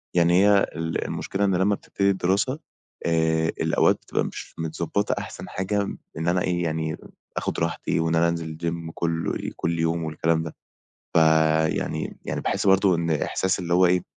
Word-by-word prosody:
يعني 85 0 +4
هي 105 0 +6 0.2
ال 80 0 -2
المشكلة 100 +1 -2
إن 95 -2 +2
لمّا 95 +3 +2
بتبتدي 100 0 -1
الدراسة 100 - +1 0.5
آآ 80 -1 +2
الأوقات - - +3
بتبقى - - -1
مش - - -7
متضبّطة 85 +5 -1
أحسن - - -8
حاجة 100 +2 -1 0.4
إن 80 +1 -2
أنا 90 +1 +2
إيه، 90 -1 0
يعني 80 -1 -2 0.4
آخُد - - -2
راحتي - - -1
و 80 0 +1
إن 80 - +1
أنا 85 +1 +4
أنزِل 80 -2 -4
الgym 85 -1 -3
كلّ 85 -1 -2
كلّ 85 0 -1
يوم 80 0 0
والكلام 80 +1 0
ده، 80 - -7 0.6
فيعني 80 -1 +2
يعني - - -3
باحس - - -1
برضه 95 -1 +5
إن 85 0 -1
إحساس 90 +5 0
اللي 85 -1 -1
هو 90 +1 +5
إيه، 90 0 +3
85 Hz, 170 wpm, -25 LUFS, 80-95 Hz, 0.6 s, هي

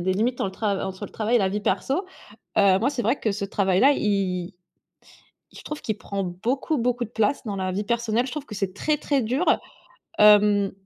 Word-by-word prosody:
des 185 +2 0
limites 235 +6 0
dans - - -1
le 195 - -2
tra 200 0 -2
entre 190 +1 -6
le - - -16
travail 225 +2 +1
et - - +5
la 195 -3 +1
vie 205 +2 -2
perso. 265 - -1 0.5
Heu, 190 -2 +5
moi, 260 +6 +2
c'est 265 -4 -3
vrai 280 - +1
que 220 - -1
ce 200 0 -3
travail-là 195 +6 +3
i 190 -3 -1 1.0
je - - -12
trouve 300 - -6
qu'il 215 -2 -3
prend 200 -2 -4
beaucoup, 240 - -2
beaucoup 245 0 0
de 220 - -11
place 225 +4 0
dans 205 -3 -4
la 185 -1 -2
vie 200 +3 -2
personnelle. 235 +1 0
Je - - -6
trouve 295 +1 -6
que 210 - -8
c'est 195 -2 -2
très, 300 +10 0
très 280 -1 0
dur, 255 +8 0 0.7
hem, 210 -1 +5
210 Hz, 220 wpm, -24 LUFS, 195-245 Hz, 1.0 s, et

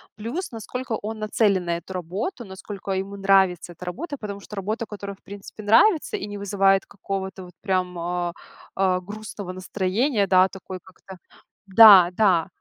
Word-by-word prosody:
Плюс, 240 - -5
насколько 240 +2 -5
он 215 +1 -5
нацелен 205 -3 +1
на 170 0 -1
эту 180 - -12
работу, 195 - -4
насколько 195 +1 -8
ему 195 +1 -3
нравится 190 -3 +2
эта 175 - -12
работа, 285 - -5
потому 200 -3 -6
что 210 - -11
работа, 215 +4 -3
которая, 200 -2 -8
в - - -45
принципе, 200 +1 -10
нравится 310 - +4
и 390 - -5
не 205 0 -7
вызывает 195 -1 +2
какого-то 190 -1 -6
вот 180 -1 -13
прям, 185 -3 -1
а, 175 0 -2 0.4
а, 185 -1 +1
грустного 205 -1 -8
настроения, 195 +5 -1
да, 185 0 +5
такой 190 -1 -9
как-то, 190 0 -14 0.5
да 195 -3 +9
да, 185 -4 +3
195 Hz, 160 wpm, -23 LUFS, 185-215 Hz, 0.5 s, да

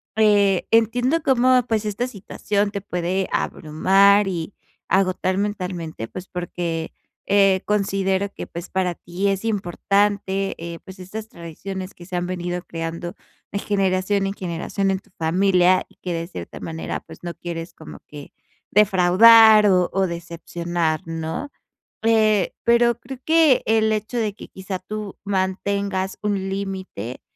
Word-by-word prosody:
Eh, 205 -3 +3
entiendo 245 +7 +3
cómo, 255 -2 +4
pues, 220 -1 0
esta 210 +4 -2
situación 205 -1 -2
te 200 - -4
puede 180 +1 -2
abrumar 195 +6 +3
y 175 0 -4 0.3
agotar 185 0 +1
mentalmente, 180 - -3
pues, 185 +1 -8
porque, 175 -2 -4 0.4
eh, 195 -2 +4
considero 195 -1 0
que, - - -7
pues, 170 +2 -8
para 185 -2 0
ti 180 +4 -3
es 195 +2 -1
importante, 200 0 0
eh, 170 0 -7
pues, 190 0 -11
estas 215 +4 -8
tradiciones 185 +3 -7
que 175 0 -14
se 185 - -5
han 175 0 -1
venido 175 -1 -4
creando 165 +1 -5 0.4
de 200 - -2
generación 195 0 0
en 195 - -2
generación 185 +2 -2
en 190 - +1
tu - - -28
familia 185 +2 +3
y - - -26
que, 180 - -3
de 165 0 -3
cierta 90 - -8
manera, 160 0 -5
pues, - - -14
no 175 -1 -6
quieres 170 0 -6
como 160 - -11
que 145 -1 -11 0.4
defraudar 210 +2 +7
o 180 -2 +3
o 190 -1 +2
decepcionar, 170 -1 -3
¿no? 165 - -4 0.5
Eh, 215 -4 +3
pero 235 0 +4
creo 255 +1 -9
que 320 -4 +4
el 220 0 +3
hecho 215 +3 -2
de 215 -3 0
que - - -11
quizá 190 -1 -6
tú 210 +1 -7
mantengas 195 0 -1
un 195 -2 -1
límite, 190 - -5
190 Hz, 145 wpm, -22 LUFS, 175-205 Hz, 0.5 s, defraudar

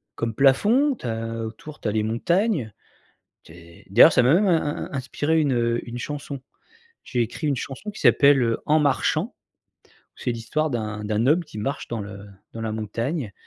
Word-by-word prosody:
comme 115 -1 -2
plafond. 220 - +4
Tu 130 - -12
as 115 0 -3
autour 145 +7 -9
tu - - -4
as - - +1
les 110 0 0
montagnes. 145 - 0 0.7
Tu - - -15
es 85 0 -16
d'ailleurs 125 +10 +8
ça - - +4
m'a 130 +6 +5
même, 200 +3 +3
in 170 -3 +3
in 145 - -3
in - - -18
inspiré 145 +4 0
une, 145 -3 +1
heu, 120 0 +1
une 120 +1 -6
chanson. 140 -1 -6 0.6
J'ai 125 -2 -1
écrit 120 +7 -3
une 140 - +1
chanson 135 - -6
qui 210 - -9
s'appelle, 140 -1 +5
heu, 115 -1 +1
En 155 +1 +4
marchant. 150 - +1 0.9
C'est 125 - -2
l'histoire 150 +7 -2
d'un 105 -3 -4
d'un 110 +3 0
homme 170 +5 +3
qui 110 - -10
marche 135 +6 -3
dans 115 -2 -3
le 100 0 -8 0.3
dans 115 - -7
la 110 - -2
montagne 115 - -3
125 Hz, 195 wpm, -24 LUFS, 115-155 Hz, 0.9 s, d'ailleurs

